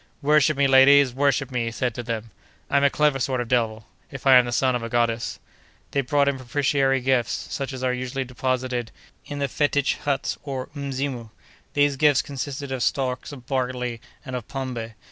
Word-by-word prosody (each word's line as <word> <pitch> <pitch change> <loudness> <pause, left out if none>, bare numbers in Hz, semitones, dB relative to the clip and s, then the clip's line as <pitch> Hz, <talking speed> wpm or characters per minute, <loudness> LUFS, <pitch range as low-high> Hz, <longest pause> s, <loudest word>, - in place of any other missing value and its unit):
"Worship 150 0 +4
me, 140 - +3
ladies! 135 0 +6
worship 135 0 +1
me!" 125 -2 -1
he - - -1
said 120 +1 -2
to 120 - -5
them. 115 -1 -5 0.4
"I'm 140 0 +3
a 140 - +6
clever 150 -1 +2
sort 130 0 -1
of 120 - -2
devil, 110 -3 0 0.2
if 135 -3 -9
I 135 - +7
am 125 - +5
the 120 - -4
son 130 +1 +2
of 120 - -2
a 115 - -5
goddess." 115 -1 0 0.5
They 140 - +1
brought 140 +2 +2
him 140 -1 +1
propitiatory 135 +1 +1
gifts, 130 -2 +1 0.2
such 135 -1 -3
as 130 -1 -6
are 125 -1 +1
usually 130 +1 -3
deposited 125 -1 -2 0.4
in 145 - -5
the 140 -1 0
fetich 145 0 +1
huts 140 -2 -2
or 135 -3 -5
mzimu. 135 -4 -4 0.5
These 145 -1 +3
gifts 145 -1 +4
consisted 140 0 -5
of 130 -2 -3
stalks 130 0 -1
of 130 -4 -11
barley 125 -3 -2 0.2
and 130 -2 -5
of 120 -3 -5
"pombe." 120 -5 -5
130 Hz, 195 wpm, -24 LUFS, 125-140 Hz, 0.5 s, I